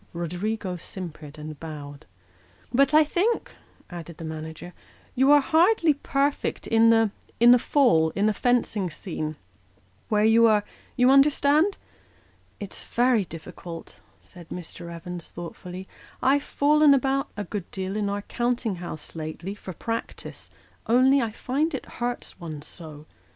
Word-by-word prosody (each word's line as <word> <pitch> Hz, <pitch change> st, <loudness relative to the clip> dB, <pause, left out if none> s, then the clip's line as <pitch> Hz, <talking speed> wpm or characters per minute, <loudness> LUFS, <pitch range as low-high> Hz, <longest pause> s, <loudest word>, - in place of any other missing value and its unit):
Roderigo 180 Hz, +3 st, -3 dB
simpered 160 Hz, -4 st, -8 dB
and 150 Hz, -1 st, -8 dB
bowed. 145 Hz, -, -9 dB, 0.3 s
" 90 Hz, -, -30 dB
But 275 Hz, +3 st, +4 dB
I 310 Hz, +1 st, +7 dB
think," 370 Hz, +10 st, 0 dB, 0.4 s
added 170 Hz, -2 st, -9 dB
the -, -, -8 dB
manager, 160 Hz, +2 st, -7 dB, 0.2 s
" -, -, -30 dB
you 265 Hz, +2 st, +4 dB
are 290 Hz, 0 st, +7 dB
hardly 330 Hz, +2 st, +4 dB
perfect 280 Hz, 0 st, -1 dB
in 225 Hz, 0 st, +4 dB
the 225 Hz, -2 st, +4 dB, 0.5 s
fall 230 Hz, -, +3 dB
in 200 Hz, -, +1 dB
the 215 Hz, -, +3 dB
fencing 230 Hz, -5 st, +1 dB
scene, 155 Hz, -2 st, -5 dB, 0.7 s
where 210 Hz, -1 st, +2 dB
you 225 Hz, +1 st, +6 dB
are 210 Hz, -2 st, +3 dB, 0.3 s
you 250 Hz, +1 st, +5 dB
understand? 295 Hz, +6 st, +4 dB, 0.3 s
" -, -, -33 dB
" -, -, -36 dB
It's 205 Hz, -, -7 dB
very 240 Hz, -4 st, +2 dB
difficult," 165 Hz, +1 st, -9 dB, 0.3 s
said 175 Hz, -3 st, -14 dB
Mr. 170 Hz, -1 st, -8 dB
Evans, 170 Hz, 0 st, -7 dB
thoughtfully; 180 Hz, +2 st, -8 dB, 0.2 s
" -, -, -25 dB
I've 285 Hz, -, +2 dB
fallen 295 Hz, 0 st, +4 dB
about, 275 Hz, +1 st, 0 dB
a 205 Hz, -, -2 dB
good 200 Hz, -3 st, -6 dB
deal, 190 Hz, +1 st, -4 dB
in 210 Hz, -1 st, -1 dB
our 200 Hz, 0 st, -3 dB
counting 240 Hz, -4 st, -1 dB
house 170 Hz, -3 st, -8 dB
lately, 160 Hz, +4 st, -5 dB
for 205 Hz, -2 st, -9 dB
practice, 230 Hz, +6 st, -6 dB, 0.4 s
only 260 Hz, +4 st, +5 dB
I 230 Hz, -, -1 dB
find 275 Hz, +8 st, -1 dB
it 265 Hz, -, -6 dB, 0.2 s
hurts 240 Hz, -4 st, -3 dB
one 155 Hz, -4 st, -7 dB
so. 155 Hz, -3 st, -10 dB
205 Hz, 150 wpm, -25 LUFS, 170-265 Hz, 0.7 s, I